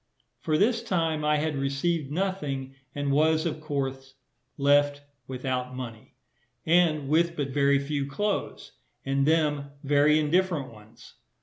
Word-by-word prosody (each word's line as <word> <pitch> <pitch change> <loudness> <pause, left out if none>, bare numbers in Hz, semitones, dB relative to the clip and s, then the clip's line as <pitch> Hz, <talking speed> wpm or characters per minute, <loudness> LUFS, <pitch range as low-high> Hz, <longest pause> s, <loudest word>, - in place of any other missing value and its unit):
For 155 -1 0
this 225 +4 +2
time 165 -8 -1
I 150 0 +2
had 155 0 -1
received 140 +3 -1
nothing, 150 -7 -3 0.2
and 145 -1 -1
was, 155 +3 +3
of 155 -2 -3
course, 135 -3 -4 0.4
left 145 0 +3 0.2
without 130 -1 -3
money, 115 -4 -8 0.5
and 160 -4 +3
with 170 +3 +2
but 145 -3 -2
very 140 0 +3
few 140 0 -2
clothes, 205 +8 -3 0.3
and 135 +1 +1
them 150 -3 +1
very 145 +2 +4
indifferent 155 -3 0
ones. 110 +1 -16
145 Hz, 130 wpm, -27 LUFS, 135-160 Hz, 0.5 s, very